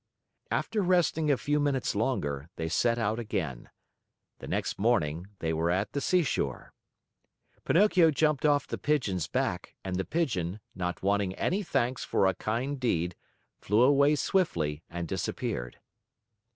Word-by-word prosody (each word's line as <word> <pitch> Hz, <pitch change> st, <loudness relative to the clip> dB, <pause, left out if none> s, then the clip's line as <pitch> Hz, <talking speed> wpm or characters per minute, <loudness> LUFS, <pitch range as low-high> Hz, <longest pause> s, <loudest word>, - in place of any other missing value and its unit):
After 215 Hz, -, 0 dB
resting 175 Hz, -4 st, +2 dB
a 140 Hz, -, +4 dB
few 145 Hz, +3 st, 0 dB
minutes 140 Hz, -3 st, 0 dB
longer, 80 Hz, -, -1 dB
they 80 Hz, -, -3 dB
set 115 Hz, +8 st, +2 dB
out 110 Hz, 0 st, 0 dB
again. 95 Hz, -, -4 dB, 0.7 s
The -, -, -8 dB
next -, -, -2 dB
morning 90 Hz, -7 st, +1 dB
they 80 Hz, -2 st, -2 dB
were 80 Hz, +1 st, 0 dB
at 95 Hz, +4 st, 0 dB
the 140 Hz, -, -2 dB
seashore. 175 Hz, -6 st, 0 dB, 0.9 s
Pinocchio 180 Hz, -3 st, +5 dB
jumped 150 Hz, -2 st, +1 dB
off 145 Hz, -2 st, +3 dB
the -, -, -5 dB
Pigeon's 100 Hz, -, 0 dB
back, -, -, -2 dB
and 95 Hz, -1 st, -3 dB
the 95 Hz, -, 0 dB
Pigeon, 105 Hz, -, -1 dB
not 90 Hz, -1 st, -4 dB
wanting 100 Hz, -1 st, +1 dB
any 195 Hz, +4 st, 0 dB
thanks 130 Hz, -, -1 dB
for -, -, +1 dB
a 95 Hz, -, +3 dB
kind 125 Hz, +9 st, -2 dB
deed, 90 Hz, -8 st, 0 dB, 0.5 s
flew 105 Hz, +4 st, +3 dB
away 140 Hz, +2 st, +5 dB
swiftly 85 Hz, -, 0 dB
and 85 Hz, 0 st, -4 dB
disappeared. -, -, -3 dB
115 Hz, 145 wpm, -29 LUFS, 90-145 Hz, 0.9 s, Pinocchio